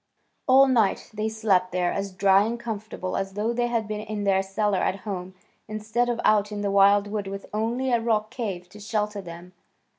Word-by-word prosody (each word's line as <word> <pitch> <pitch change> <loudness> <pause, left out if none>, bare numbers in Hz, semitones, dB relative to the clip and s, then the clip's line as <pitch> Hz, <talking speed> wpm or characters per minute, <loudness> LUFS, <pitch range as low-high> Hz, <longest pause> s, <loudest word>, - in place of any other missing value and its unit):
All 265 +1 +7
night 230 -6 +1
they 215 +1 -1
slept 200 -5 +1
there 180 -1 0
as 195 0 -3
dry 195 +1 +4
and 235 +2 -3
comfortable 215 -5 -5
as 195 0 -3
though 215 +4 -1
they 240 0 0
had 230 -3 -1
been 215 0 -3
in 215 -1 -4
their 195 -1 +3
cellar 195 0 0
at 190 +1 -1
home 185 -3 -5 0.3
instead 220 +3 -1
of 235 -1 -1
out 210 0 +3
in 205 -1 -4
the 200 -1 -1
wild 200 +1 +5
wood 205 -1 -4
with 195 0 -6
only 235 +5 -1
a 235 -1 +2
rock 215 -2 0
cave 195 -8 -4
to 210 - -13
shelter 210 -1 -2
them. 175 0 -11
210 Hz, 205 wpm, -25 LUFS, 195-220 Hz, 0.3 s, All